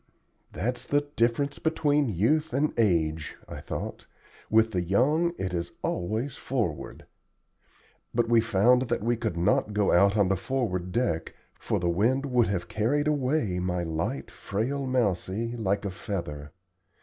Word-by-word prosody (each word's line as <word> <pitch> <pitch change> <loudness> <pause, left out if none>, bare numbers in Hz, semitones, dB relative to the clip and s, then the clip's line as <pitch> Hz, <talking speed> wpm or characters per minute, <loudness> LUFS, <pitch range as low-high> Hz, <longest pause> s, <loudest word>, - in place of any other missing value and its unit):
"That's 125 +2 -3
the 145 0 +3
difference 120 +5 +1
between 150 -3 +1
youth 150 - +1
and 150 +2 +1
age," 80 -8 +1
I - - -7
thought. - - -6 0.4
"With 110 +1 +4
the 90 -4 0
young 145 - +2
it 95 -1 -3
is 85 -1 -3
always 110 +9 -2
'forward.'" 115 - -3 1.1
But 120 0 +1
we 115 -1 +5
found 115 +4 +3
that - - -1
we 120 +1 +2
could 110 -6 -3
not 105 +4 +2
go 105 -1 +2
out 100 +4 +4
on 100 -2 +4
the 95 - +2
forward 95 -6 -2
deck, 90 -8 -1 0.2
for - - -1
the 90 - -1
wind 115 +11 +2
would 125 -4 +2
have 95 -3 -2
carried 140 +8 0
away 135 -9 +1
my 90 -1 -1
light, 85 - -3
frail 130 +7 -3
Mousie, 115 -1 0
like 100 -3 -1
a 100 - -2
feather. 85 -7 -5
110 Hz, 150 wpm, -27 LUFS, 90-130 Hz, 1.1 s, we